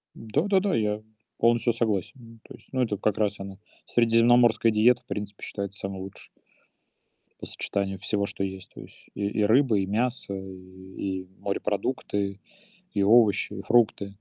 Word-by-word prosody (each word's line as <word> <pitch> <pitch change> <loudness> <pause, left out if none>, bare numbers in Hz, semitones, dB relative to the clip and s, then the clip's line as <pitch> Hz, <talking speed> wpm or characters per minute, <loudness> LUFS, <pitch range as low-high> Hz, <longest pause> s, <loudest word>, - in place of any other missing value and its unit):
Да-да-да, 190 - +1
я 105 -1 0 0.4
полностью 120 0 +3
согласен. 115 - -1
М, 115 -1 -15
то - - -13
есть, - - -19
ну 130 -1 0
это 105 -5 0
как 105 0 0
раз 105 -2 0
она- 95 -1 -8 0.3
средиземноморская 115 -1 +4
диета, 115 +3 +4
в - - -50
принципе, 105 -1 -6
считается 100 0 -5
самой 95 -1 -5
лучшей 95 0 -10 1.1
по - - -7
сочетанию 95 -1 -3
всего, 100 0 -1
что 100 - -4
есть. 95 -1 -6
То - - -10
есть - - -16
и 100 - -2
и 105 +1 0
рыба, 115 -1 +4
и 95 - +1
мясо, 115 +1 -1
и 95 0 -10 0.2
и - - -22
морепродукты, 100 -1 -2 0.6
и 100 - +1
овощи, 110 0 +4
и - - -6
фрукты. 115 -4 +2
105 Hz, 160 wpm, -26 LUFS, 100-115 Hz, 1.1 s, средиземноморская